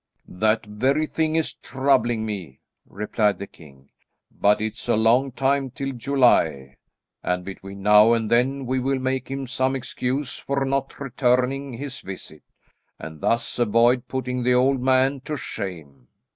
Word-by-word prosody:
"That 110 Hz, +3 st, 0 dB
very 130 Hz, +9 st, 0 dB
thing 155 Hz, 0 st, -1 dB
is 160 Hz, -1 st, 0 dB
troubling 130 Hz, -4 st, 0 dB
me," 95 Hz, -11 st, -6 dB, 0.3 s
replied 105 Hz, 0 st, 0 dB
the 100 Hz, -, -6 dB
king, 70 Hz, -7 st, -18 dB, 0.4 s
"but 105 Hz, +1 st, +2 dB
it's 110 Hz, 0 st, -4 dB
a -, -, +4 dB
long 120 Hz, +5 st, +3 dB
time 135 Hz, +1 st, 0 dB
till 135 Hz, +2 st, -4 dB
July, 120 Hz, -, +2 dB, 0.4 s
and 90 Hz, 0 st, -2 dB
between 95 Hz, 0 st, -9 dB
now 105 Hz, +2 st, +6 dB
and 115 Hz, -2 st, 0 dB
then 130 Hz, +3 st, +2 dB
we 130 Hz, +1 st, 0 dB
will 135 Hz, +1 st, 0 dB
make 130 Hz, 0 st, -2 dB
him 135 Hz, 0 st, -4 dB
some 130 Hz, +2 st, 0 dB
excuse 130 Hz, +2 st, -3 dB
for 140 Hz, 0 st, -1 dB
not 135 Hz, 0 st, -2 dB
returning 130 Hz, +1 st, 0 dB
his 135 Hz, +2 st, -6 dB
visit, 95 Hz, -5 st, -9 dB, 0.6 s
and 80 Hz, -1 st, -9 dB
thus 115 Hz, +1 st, 0 dB
avoid 120 Hz, +2 st, +3 dB
putting 125 Hz, -1 st, -3 dB
the 125 Hz, +1 st, +3 dB
old 130 Hz, +1 st, +3 dB
man 130 Hz, +1 st, +2 dB
to 150 Hz, +3 st, -5 dB
shame." 80 Hz, -, -7 dB
125 Hz, 150 wpm, -23 LUFS, 105-135 Hz, 0.6 s, now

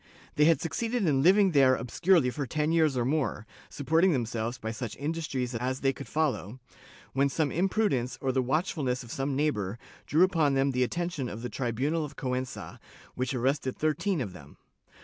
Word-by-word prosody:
They 150 Hz, -, +4 dB
had 165 Hz, 0 st, +4 dB
succeeded 225 Hz, +6 st, -1 dB
in 140 Hz, -5 st, +2 dB
living 190 Hz, +4 st, +5 dB
there 135 Hz, -4 st, +5 dB
obscurely 130 Hz, +4 st, +2 dB
for 140 Hz, 0 st, -4 dB
ten 150 Hz, +4 st, 0 dB
years 160 Hz, -5 st, +3 dB
or 120 Hz, -, +1 dB
more, 130 Hz, -6 st, -1 dB, 0.2 s
supporting 160 Hz, +5 st, +2 dB
them 125 Hz, -4 st, 0 dB
selves 115 Hz, +2 st, -3 dB
by 110 Hz, -, -4 dB
such 110 Hz, -1 st, -5 dB
industries 145 Hz, -5 st, -3 dB
as 130 Hz, +3 st, -2 dB
they 135 Hz, -1 st, +2 dB
could 140 Hz, -, -9 dB
follow, 130 Hz, -, -1 dB, 0.5 s
when 140 Hz, +1 st, +2 dB
some 145 Hz, 0 st, 0 dB
impru 195 Hz, +5 st, +1 dB
dence, 125 Hz, -1 st, -2 dB
or 135 Hz, -, 0 dB
the 130 Hz, 0 st, +1 dB
watchfulness 135 Hz, -2 st, -1 dB
of 120 Hz, -, -11 dB
some 135 Hz, 0 st, -2 dB
neighbor, 115 Hz, -9 st, -1 dB, 0.3 s
drew 160 Hz, +4 st, +4 dB
upon 160 Hz, -7 st, +2 dB
them 135 Hz, +1 st, +2 dB
the 125 Hz, -1 st, -1 dB
attention 170 Hz, -2 st, -2 dB
of 115 Hz, +3 st, -7 dB
the 125 Hz, -, -3 dB
tribunal 135 Hz, +7 st, -1 dB
of 145 Hz, -1 st, -7 dB
Cuenca, 130 Hz, -1 st, -4 dB, 0.3 s
which 130 Hz, +2 st, -2 dB
arrested 130 Hz, +1 st, 0 dB
thirteen 160 Hz, +3 st, 0 dB
of 100 Hz, -7 st, -4 dB
them. 90 Hz, -, -14 dB
135 Hz, 190 wpm, -28 LUFS, 125-160 Hz, 0.5 s, living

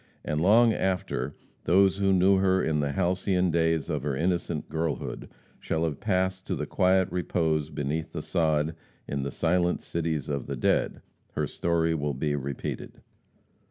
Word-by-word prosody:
And 75 Hz, 0 st, -1 dB
long 110 Hz, +5 st, +5 dB
after 90 Hz, -9 st, -2 dB, 0.3 s
those 95 Hz, +1 st, +4 dB
who 100 Hz, -1 st, +2 dB
knew 95 Hz, +1 st, +5 dB
her 95 Hz, 0 st, +3 dB
in 75 Hz, -1 st, +1 dB
the 70 Hz, -1 st, -1 dB
halcyon 90 Hz, 0 st, +1 dB
days 80 Hz, -2 st, +1 dB
of 75 Hz, -, -2 dB
her 70 Hz, 0 st, -2 dB
innocent 85 Hz, 0 st, -1 dB
girlhood 80 Hz, 0 st, -3 dB, 0.3 s
shall 80 Hz, 0 st, -1 dB
have 80 Hz, -4 st, -2 dB
passed 95 Hz, -2 st, -1 dB
to -, -, -1 dB
the -, -, -3 dB
quiet 95 Hz, 0 st, +3 dB
repose 80 Hz, -4 st, 0 dB
beneath 80 Hz, +2 st, -3 dB
the -, -, -5 dB
sod 80 Hz, -1 st, +1 dB, 0.3 s
in 70 Hz, -1 st, -2 dB
"the 70 Hz, -, -2 dB
silent 85 Hz, +4 st, +1 dB
cities 80 Hz, -4 st, -2 dB
of 70 Hz, -3 st, -3 dB
the -, -, -3 dB
dead," -, -, 0 dB, 0.3 s
her -, -, 0 dB
story 85 Hz, -1 st, 0 dB
will 75 Hz, -3 st, -2 dB
be 75 Hz, +2 st, -1 dB
repeated. 70 Hz, -1 st, -5 dB
80 Hz, 160 wpm, -27 LUFS, 75-95 Hz, 0.3 s, long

